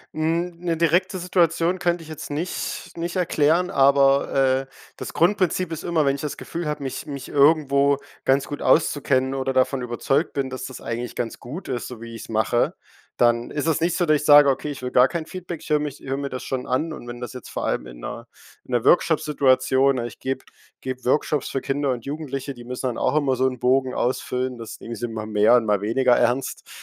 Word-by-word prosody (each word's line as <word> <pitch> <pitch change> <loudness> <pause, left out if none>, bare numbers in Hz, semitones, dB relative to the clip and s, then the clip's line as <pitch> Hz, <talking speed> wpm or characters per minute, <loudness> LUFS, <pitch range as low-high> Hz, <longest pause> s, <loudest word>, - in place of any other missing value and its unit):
Hm, 165 +3 -1
'ne 170 -2 -1
direkte 175 +4 +2
Situation 175 0 +1
könnte 175 -1 0
ich 160 - -12
jetzt 155 -2 -8
nicht 160 +5 -4
nicht 170 +2 -3
erklären, 170 0 +2
aber, 140 -3 +4 0.3
äh, - - -10 0.3
das - - -6
Grundprinzip 185 -1 +1
ist 160 - -6
immer, 165 -3 +1
wenn 140 0 +2
ich 140 - -7
das 150 - -4
Gefühl 170 -1 -5
habe, 150 -1 -3
mich 135 - -5
mich 140 -3 -7
irgendwo 140 -1 +4 0.3
ganz 135 +1 +2
gut 145 - -6
auszukennen 140 -4 +2
oder 135 0 -1
davon 130 0 +1
überzeugt 125 +5 0
bin, 135 -2 -2
dass 130 0 -6
das 130 - -7
eigentlich 120 +1 -5
ganz 115 -2 -3
gut 150 +10 -8
ist, 125 -2 -3
so 125 -3 -9
wie 115 0 -8
ich's 115 - -9
mache, 110 +1 +1 0.4
dann 120 0 +2
ist 150 0 -2
es 160 - +2
nicht 170 +1 +1
so, 175 - +2
dass 155 -2 +4
ich 150 - -5
sage: 145 -1 +8
„Okay, 135 +2 -1
ich 140 - -8
will 125 0 -4
gar 125 +1 +6
kein 165 -2 -3
Feedback“, 175 -2 -7
ich - - -11
höre 150 -1 +3
mich 145 -1 -5
höre 135 0 -4
mir 140 0 -3
das 130 -1 -6
schon 130 -1 -3
an 145 +6 0
und 120 - -10
wenn 120 0 -7
das 125 - -5
jetzt 125 - -9
vor - - -4
allem - - -1
in - - -11
'ner - - -7 0.4
in - - -13
'ner 120 -2 +2
Workshop-Situation 135 -5 +3
ich 120 - -9
gebe 130 0 -3 0.4
gebe 130 -1 -5
Workshops 145 +2 +1
für 135 - -2
Kinder 140 0 -1
und 120 -2 -4
Jugendliche, 140 -2 -4
die 120 -2 -12
müssen 125 +1 -4
dann 120 - -3
auch - - 0
immer 140 -3 +2
so 130 +1 +3
'n 130 -1 -3
Bogen 130 +1 +2
ausfüllen, 125 0 -1
das 115 -1 -8
nehmen 115 - -6
sie 120 +2 -3
mal 110 -1 -5
mehr 105 +2 +4
und 120 -2 +3
mal 105 -2 +2
weniger 125 +4 +3
ernst. 130 +3 0
135 Hz, 225 wpm, -23 LUFS, 125-155 Hz, 0.4 s, sage